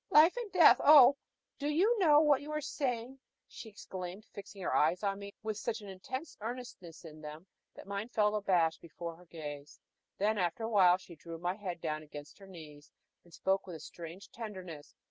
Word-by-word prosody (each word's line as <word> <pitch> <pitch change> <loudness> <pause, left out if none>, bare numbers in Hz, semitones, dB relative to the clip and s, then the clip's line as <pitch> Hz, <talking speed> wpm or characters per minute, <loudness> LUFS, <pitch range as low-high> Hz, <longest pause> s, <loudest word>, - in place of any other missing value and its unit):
"Life 310 +4 +6
and 475 -4 -5
death! 355 -4 +7 0.8
do 290 0 -1
you 380 +11 +3
know 300 -5 +6
what 290 -3 +4
you 295 +1 -7
are 305 - 0
saying?" 265 -3 -3 0.3
she 225 - -10
exclaimed, 190 -1 -8
fixing 200 0 -10
her - - -1
eyes 165 +6 +2
on 200 -1 -1
me 200 0 -8
with 215 -1 -3
such 225 +1 -3
intense 260 - -7
earnestness 220 -8 -8
in 155 -1 -11
them 155 +3 -9 0.3
that - - -11
mine 200 +3 -4
fell 210 -3 +2
abashed 180 -6 +1
before 170 0 -7
their 180 +2 -18
gaze. 150 -3 -9 0.4
Then, 210 +1 +1
after 175 +4 -1
a 225 - -2
while, 185 -5 +5
she 180 -2 -13
drew 165 +1 -9
my 175 +2 -2
head 185 -4 -6
down 155 -2 -2
against 150 +1 -11
her 195 - -13
knees, 155 -5 -12 0.3
and 175 - -21
spoke 190 +3 -1
with 175 - -7
a - - -8
strange 170 +4 -10
tenderness. 185 -9 -8
195 Hz, 190 wpm, -32 LUFS, 170-230 Hz, 0.8 s, death